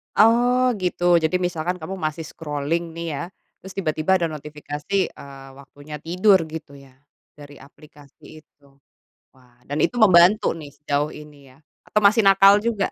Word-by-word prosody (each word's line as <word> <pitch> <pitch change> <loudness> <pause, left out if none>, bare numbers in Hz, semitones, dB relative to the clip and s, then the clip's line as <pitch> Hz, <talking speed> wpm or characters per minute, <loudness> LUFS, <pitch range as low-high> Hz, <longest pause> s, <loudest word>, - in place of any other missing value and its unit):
Oh, 245 +3 +4
gitu. 175 -1 +2
Jadi 160 +2 -1
misalkan 175 0 -2
kamu 180 +2 -8
masih 155 +1 -4
scrolling 160 +2 -4
nih 170 0 -6
ya, - - -4 0.4
terus 190 0 -12
tiba-tiba 160 0 0
ada 170 -3 -1
notifikasi, 150 +5 -4
eee, 135 -1 -13
waktunya 145 +2 -11
tidur 185 +5 +3
gitu 160 -2 -9
ya, 135 -2 -16 0.4
dari 145 -1 -14
aplikasi 145 +1 -17
itu. 140 -2 -28 0.6
Wah, 125 -2 -26
dan 145 +2 -2
itu 245 - 0
membantu 190 0 +5
nih 150 -3 -10
sejauh 145 +1 -3
ini 145 -3 -14
ya 130 - -22 0.3
atau 210 - 0
masih 210 +2 +4
nakal 195 +1 +5
juga? 220 -4 -1
160 Hz, 155 wpm, -22 LUFS, 145-190 Hz, 0.6 s, membantu